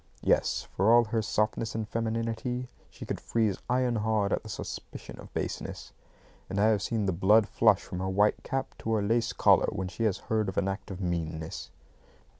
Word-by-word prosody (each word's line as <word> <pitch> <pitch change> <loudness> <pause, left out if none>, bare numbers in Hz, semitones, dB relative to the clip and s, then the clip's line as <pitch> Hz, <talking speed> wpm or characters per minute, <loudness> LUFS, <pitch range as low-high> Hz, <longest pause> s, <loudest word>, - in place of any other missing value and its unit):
Yes; - - +2
for 100 +4 +4
all 120 0 +7
her 110 0 -1
softness 110 +1 -1
and 110 -1 -2
femininity, 115 +3 -2 0.2
she - - -10
could - - -4
freeze 110 -4 0
iron 125 -1 +2
hard 105 -2 +1
at - - 0
the - - -11
suspicion - - -7
of - - -11
baseness; - - -4 0.6
and 100 - -2
I 105 +2 +5
have 105 -2 +2
seen 110 0 -1
the 95 - +2
blood 105 +4 +4
flush 110 -4 +3
from 90 - -6
her 95 0 -2
white 105 +2 +2
cap 135 0 -3
to 115 - -2
her 105 -2 +1
lace 115 +2 +1
collar - - +4
when 95 -2 -3
she 115 +5 -2
has 105 -4 +1
heard 110 -2 -1
of 95 - -7
an 100 - +2
act 95 +2 -4
of 95 -1 -6
meanness. 80 -7 -3
110 Hz, 200 wpm, -29 LUFS, 95-115 Hz, 0.6 s, all